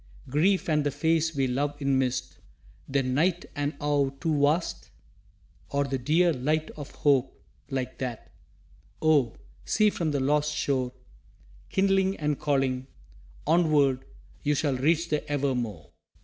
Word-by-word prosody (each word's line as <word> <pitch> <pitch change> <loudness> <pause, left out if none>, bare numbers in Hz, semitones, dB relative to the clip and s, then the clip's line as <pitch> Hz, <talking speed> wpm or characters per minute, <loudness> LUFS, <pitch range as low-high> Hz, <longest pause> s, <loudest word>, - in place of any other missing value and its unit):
Grief 170 +9 +2
and 150 -2 +2
the 145 - +1
face 160 +2 +1
we 135 -1 +2
love 145 +3 -1
in 140 -2 +2
mist 130 -1 -2 0.5
Then 135 -2 0
night 175 +5 +1
and 145 +1 -2
awe 145 -2 +1
too 145 +2 -1
vast? 155 +5 +1 0.8
Or 140 0 +1
the 135 -1 -2
dear 165 +7 +3
light 155 +4 -1
of 145 -2 -8
Hope 135 -3 +1 0.3
like 130 -1 -3
that, 125 -4 -5 0.7
Oh, 145 -7 +3 0.3
see, 215 -1 +3
from 170 -5 -1
the 145 -2 0
lost 150 +2 +1
shore 130 -4 0 0.8
Kindling 195 0 +2
and 150 -2 -1
calling 135 -3 0 0.6
"Onward, 150 -5 +3 0.4
you 150 0 +1
Shall 140 -2 0
reach 160 +6 +1
the 150 -1 0
Evermore!" 120 - -2
145 Hz, 135 wpm, -27 LUFS, 135-155 Hz, 0.8 s, dear